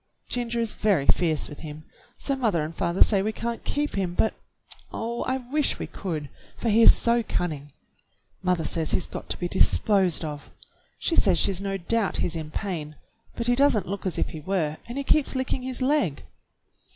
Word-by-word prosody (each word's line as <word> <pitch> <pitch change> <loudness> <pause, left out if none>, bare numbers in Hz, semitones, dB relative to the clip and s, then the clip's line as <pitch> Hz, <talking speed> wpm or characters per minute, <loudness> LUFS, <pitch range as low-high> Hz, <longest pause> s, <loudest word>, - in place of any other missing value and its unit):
Ginger 235 -1 -1
is 230 -2 -1
very 195 -10 +1
fierce 160 -2 +2
with 150 - -10
him, 155 0 -8 0.3
so 275 - 0
mother 215 - +1
and 155 +2 -5
father 170 +3 +3
say 200 -3 +2
we 215 +2 0
can't 235 +1 -4
keep 295 +1 -1
him, 185 -3 -2
but, 220 - +2 0.6
oh, 235 +1 -3
I 260 - 0
wish 270 +4 0
we - - -4
could, 160 -6 -5 0.3
for 235 - -1
he 220 +2 +5
is - - +9
so 235 0 +3
cunning! 150 -9 -3 0.7
Mother 180 -3 +1
says 160 -1 0
he's 180 - +2
got - - -8
to - - -2
be 175 - -2
disposed 190 -2 +3
of. 145 -2 -7 0.5
She 335 - 0
says 185 -4 +4
she's 195 +1 +1
no 195 0 -2
doubt 205 +3 +1
he's 170 - -1
in 160 -2 -5
pain, 155 -4 -4 0.4
but 235 - -3
he 245 - +3
does 280 -2 +4
n't 205 - -3
look 200 0 -3
as 180 - -2
if - - 0
he 160 - -7
were, 155 -2 -1
and 240 +3 -6
he 280 - -1
keeps 280 0 +2
licking 260 0 -1
his 255 0 -3
leg." 265 - +1
195 Hz, 200 wpm, -26 LUFS, 165-235 Hz, 0.7 s, is